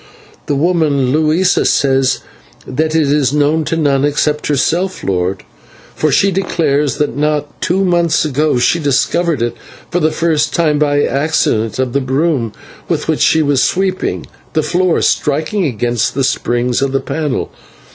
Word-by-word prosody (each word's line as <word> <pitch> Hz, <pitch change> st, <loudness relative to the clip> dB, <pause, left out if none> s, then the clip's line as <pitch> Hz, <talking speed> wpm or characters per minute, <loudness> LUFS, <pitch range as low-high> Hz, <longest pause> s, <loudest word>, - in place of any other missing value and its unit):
"The 145 Hz, -, 0 dB
woman 145 Hz, -4 st, +1 dB
Luisa 155 Hz, +5 st, +2 dB
says 135 Hz, -2 st, +1 dB, 0.4 s
that 155 Hz, +4 st, -2 dB
it 150 Hz, -3 st, +2 dB
is 145 Hz, -3 st, +2 dB
known 150 Hz, +2 st, +2 dB
to 165 Hz, -, -1 dB
none 140 Hz, -3 st, +1 dB
except 150 Hz, +1 st, 0 dB
herself, 170 Hz, +6 st, 0 dB
lord, 95 Hz, 0 st, -1 dB, 0.5 s
for 155 Hz, -, 0 dB
she 195 Hz, +6 st, +3 dB
declares 155 Hz, -6 st, 0 dB
that 150 Hz, -5 st, -1 dB
not 150 Hz, 0 st, -2 dB
two 190 Hz, +3 st, +1 dB
months 170 Hz, -3 st, +2 dB
ago 150 Hz, -1 st, 0 dB
she 145 Hz, +7 st, +2 dB
discovered 150 Hz, 0 st, 0 dB
it 120 Hz, -, -2 dB, 0.4 s
for 180 Hz, -, +1 dB
the 155 Hz, -, +2 dB
first 155 Hz, -1 st, 0 dB
time 155 Hz, -3 st, +1 dB
by 145 Hz, -1 st, +1 dB
the 145 Hz, -, +1 dB
accident 135 Hz, -6 st, 0 dB
of 130 Hz, -2 st, -1 dB
the 140 Hz, -, +1 dB
broom 130 Hz, -3 st, 0 dB, 0.4 s
with -, -, -1 dB
which -, -, 0 dB
she 160 Hz, -1 st, +3 dB
was 140 Hz, -3 st, +2 dB
sweeping 185 Hz, +6 st, -1 dB, 0.3 s
the 155 Hz, -, +1 dB
floor 175 Hz, +3 st, +1 dB
striking 155 Hz, +7 st, 0 dB
against 120 Hz, -3 st, -1 dB
the 135 Hz, -, 0 dB
springs 120 Hz, 0 st, 0 dB
of 135 Hz, -1 st, -1 dB
the 135 Hz, -, +2 dB
panel. 150 Hz, -3 st, -3 dB
150 Hz, 160 wpm, -15 LUFS, 135-160 Hz, 0.5 s, she